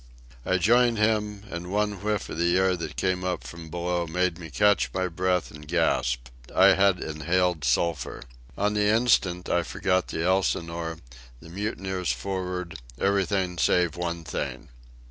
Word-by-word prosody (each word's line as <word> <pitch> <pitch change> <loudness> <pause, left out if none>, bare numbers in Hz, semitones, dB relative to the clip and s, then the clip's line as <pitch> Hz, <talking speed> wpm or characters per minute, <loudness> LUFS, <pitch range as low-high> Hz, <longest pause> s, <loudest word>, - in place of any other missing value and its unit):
I 95 - +3
joined 120 +5 +4
him, 105 -1 0
and 85 +1 -5
one 105 -1 0
whiff 105 -1 -1
of - - -6
the 85 +1 +3
air 95 0 +3
that 85 - -6
came 95 -1 0
up 90 -1 -2
from 85 -1 -9
below 85 +1 -2
made 90 +1 0
me 80 -2 -8
catch 105 +6 +3
my 95 -1 +1
breath 90 +1 0
and 75 0 -12
gasp. - - 0 0.3
I 95 +1 +7
had 95 -2 +3
inhaled 85 +1 0
sulphur. 75 +6 0 0.3
On 105 +1 +1
the 105 0 +2
instant 105 -6 +2
I 85 - +2
forgot 95 +2 0
the 80 - -3
Elsinore, 85 -3 0 0.4
the 85 - -13
mutineers 95 - -2
for'ard, 90 +5 -4 0.2
everything 95 -1 0
save 90 -3 +2
one 85 -1 -3
thing. 70 - -5
90 Hz, 155 wpm, -26 LUFS, 85-100 Hz, 0.4 s, I